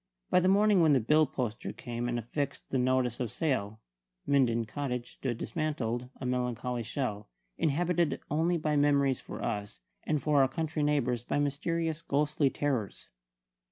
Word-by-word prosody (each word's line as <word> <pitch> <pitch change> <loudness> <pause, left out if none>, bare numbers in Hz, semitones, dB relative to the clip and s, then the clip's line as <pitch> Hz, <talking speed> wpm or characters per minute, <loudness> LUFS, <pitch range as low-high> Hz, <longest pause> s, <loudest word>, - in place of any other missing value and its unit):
By - - +6
the 185 - +2
morning 200 0 +5
when 155 -3 +5
the 135 - +5
bill 150 +6 +4
poster 120 -4 -3
came 120 0 -4
and 120 - -1
affixed 140 +5 -3
the 130 - +1
notice 125 -1 +1
of 120 -3 -1
sale, 110 -8 -1 0.5
Minden 120 -5 +2
Cottage 125 -1 -4
stood 120 -4 -3
dismantled 125 -6 -2
a 130 - -5
melancholy 125 -1 -1
shell, 110 -3 -3 0.3
inhabited 170 +2 +1
only 165 +3 +2
by 155 -1 0
memories 140 -2 +3
for - - -7
us, 105 - -3 0.2
and 155 -1 0
for 145 -1 +3
our 135 - +5
country 155 +1 -2
neighbours 140 -5 +1
by 120 - -2
mysterious 160 +3 -1
ghostly 150 -1 +1
terrors. 130 -8 -2
140 Hz, 155 wpm, -30 LUFS, 120-155 Hz, 0.5 s, By